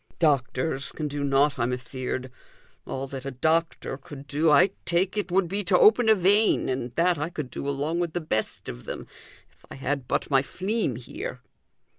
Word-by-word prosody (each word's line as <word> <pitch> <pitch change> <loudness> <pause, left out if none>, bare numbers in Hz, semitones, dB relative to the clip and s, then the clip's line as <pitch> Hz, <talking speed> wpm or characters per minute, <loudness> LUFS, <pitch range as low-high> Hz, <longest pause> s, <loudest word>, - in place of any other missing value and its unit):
"Doctors 140 -1 +1
can 155 - -3
do 145 0 -3
nought, 140 0 +2
I'm 120 +1 +1
afeard. 130 0 -4 0.6
All 135 +1 -3
that 135 -1 -7
a 140 - -3
doctor 160 +1 0
could 140 0 -10
do, 150 +3 +1
I 150 +6 +6
take 180 +3 +1
it, 205 -3 -2
would 185 0 +3
be 200 +4 -2
to 180 0 +4
open 220 +3 +6
a 220 - +7
vein, 205 0 +3
and 130 -2 -2
that 170 -1 +2
I 150 +3 -2
could 150 -7 -6
do 140 - -4
along 145 +5 -1
with 170 -2 -1
the 175 - 0
best 130 -10 -2
of - - -7
them, - - -6 0.5
if - - -32
I - - -8
had 135 -1 -2
but - - -1
my 135 -1 +5
fleam 190 - -2
here." 125 +1 -7
145 Hz, 195 wpm, -26 LUFS, 135-175 Hz, 0.6 s, a